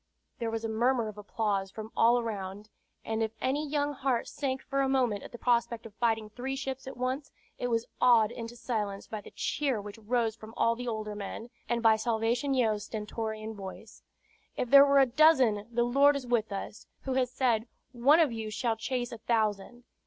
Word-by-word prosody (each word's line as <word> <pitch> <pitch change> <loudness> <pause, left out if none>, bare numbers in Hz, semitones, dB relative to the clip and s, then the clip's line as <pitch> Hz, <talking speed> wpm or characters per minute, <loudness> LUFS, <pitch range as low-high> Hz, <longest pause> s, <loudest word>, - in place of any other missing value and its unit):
There 230 - -1
was 225 0 -3
a - - 0
murmur 235 +1 +1
of 210 - -11
applause 205 -2 -1
from 220 +3 -8
all 235 +2 +5
around; 205 -2 -5 0.3
and 225 0 -1
if 220 0 -1
any 290 +3 -1
young 290 0 0
heart 265 -4 -1
sank 265 -2 -3
for 275 0 -1
a 270 - +1
moment 245 -7 +1
at - - -10
the 240 - -8
prospect 235 -1 0
of 220 - -10
fighting 225 -1 0
three 260 +4 -4
ships 270 -1 -5
at 265 - -7
once, 260 +3 -2 0.3
it 245 - -1
was 230 -1 0 0.2
awed 235 -3 +5
into 235 0 -7
silence 210 -5 -3
by 215 -2 -6
the - - -12
cheer 275 -6 -1
which 205 +2 -9
rose 225 0 0
from 220 0 -12
all 230 0 +3
the 245 +1 -6
older 215 -2 -3
men, 210 +3 -7 0.2
and 235 0 0
by 220 -1 +6
Salvation 235 +4 0
Yeo's 215 -5 +1
stentorian 220 0 -4
voice: 205 +2 -10 0.6
"If 245 - -2
there 280 0 +9
were 280 0 +4
a 270 - +7
dozen, 255 -6 +4
the 240 0 +2
Lord 280 +4 +4
is 275 -2 -4
with 235 -3 0
us, 200 +2 -6
who 265 - -3
has 255 -1 +1
said, 245 -3 +1 0.2
'One 265 +6 +5
of 315 -6 +4
you 225 -1 -4
shall 225 +1 -1
chase 245 +1 -2
a 235 - -7
thousand.' 220 +1 -1
235 Hz, 205 wpm, -30 LUFS, 220-255 Hz, 0.6 s, there